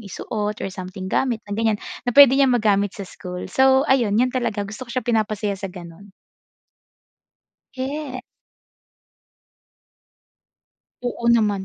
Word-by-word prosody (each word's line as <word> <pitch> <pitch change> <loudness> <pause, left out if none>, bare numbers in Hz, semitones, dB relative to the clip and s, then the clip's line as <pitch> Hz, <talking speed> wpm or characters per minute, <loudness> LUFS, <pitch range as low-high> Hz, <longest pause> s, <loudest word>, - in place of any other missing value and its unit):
isuot 210 0 -4
or - - -2
something 185 0 -7
gamit 230 +3 -1
na 205 - -8
ganyan, 220 0 +1 0.3
na 245 - -1
puwede 280 -3 +10
niyang 270 -2 +4
magamit 205 -2 +1
sa 200 - -6
school. 180 0 -8
So, 265 +1 +4
ayun, 235 -7 +2
'yan 250 +2 +2
talaga 230 -5 -1
gusto 215 +5 -8
ko - - -9
siya 255 - -1
pinapasaya 215 -3 0
sa 195 0 -5
gano'n. 180 +2 -12 1.7
Ye 265 0 -4 2.9
Oo 235 -1 -4
naman. 210 -4 +2
215 Hz, 130 wpm, -22 LUFS, 200-255 Hz, 2.9 s, puwede